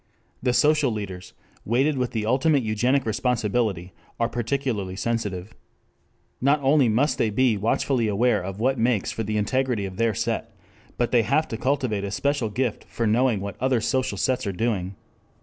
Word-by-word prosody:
The 125 - +1
social 150 +2 +3
leaders, 95 -4 -6 0.3
weighted 135 +7 +1
with 125 -2 -1
the 110 -2 -3
ultimate 135 +4 +2
eugenic 125 +5 +1
responsibility, 110 -5 -1 0.3
are 115 - +2
peculiarly 120 -5 -2
sensitive. 105 -3 -3 0.9
Not 140 +3 +3
only 135 -2 +4
must 130 +8 +1
they 110 - +2
be 120 +2 +2
watchfully 115 +3 0
aware 110 +3 +2
of 95 +2 -6
what 130 +2 +1
makes 115 -3 +1
for - - -4
the 105 0 -2
integrity 120 0 0
of 95 -1 -7
their 115 -2 +1
set, - - -2 0.4
but 120 - 0
they 120 - +5
have 140 +8 +1
to - - -3
cultivate 130 -6 0
a 100 - -3
special 130 +3 0
gift 120 +1 -2
for 115 - -3
knowing 115 -1 +2
what 100 +2 -7
other 130 -2 +2
social 130 +3 -1
sets 125 -4 0
are - - 0
doing. 95 -2 -2
115 Hz, 170 wpm, -24 LUFS, 105-130 Hz, 0.9 s, they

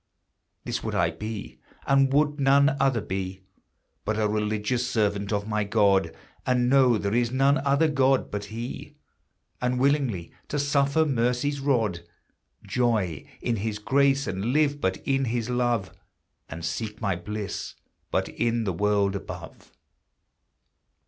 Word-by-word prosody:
This - - -3
would - - -3
I 85 -1 +2
be, 105 +4 -7 0.3
and 135 -1 +4
would 150 +1 +2
none 140 0 +4
other 130 -4 +2
be, 95 0 -4 0.6
But 110 +1 -1
a 110 -1 +2
religious 105 +3 -1
servant 105 -4 0
of 100 0 -1
my 105 -1 0
God; 100 -2 +3 0.3
And 125 -1 +2
know 130 -4 +5
there 100 0 -2
is 120 0 +2
none 135 +3 +3
other 140 +3 +2
God 135 -3 +2
but 105 0 -3
he. 115 +4 -7 0.7
And 125 0 0
willingly 130 - +1
to 145 - -3
suffer 140 +2 +2
mercy's 130 +1 0
rod, 115 -10 +1 0.7
Joy 110 - 0
in 120 -2 0
his 105 +1 -2
grace, 135 +5 +2
and 95 +2 -3
live 145 +3 +1
but 95 0 0
in 135 -1 +1
his 120 0 -2
love, 120 -5 0 0.6
And 80 +2 -6
seek 105 +5 -4
my 100 -5 0
bliss 105 +3 -5 0.3
but - - 0
in 115 0 -1
the 95 -4 -1
world 100 +1 +1
above. 100 - -8
115 Hz, 140 wpm, -26 LUFS, 105-135 Hz, 0.7 s, know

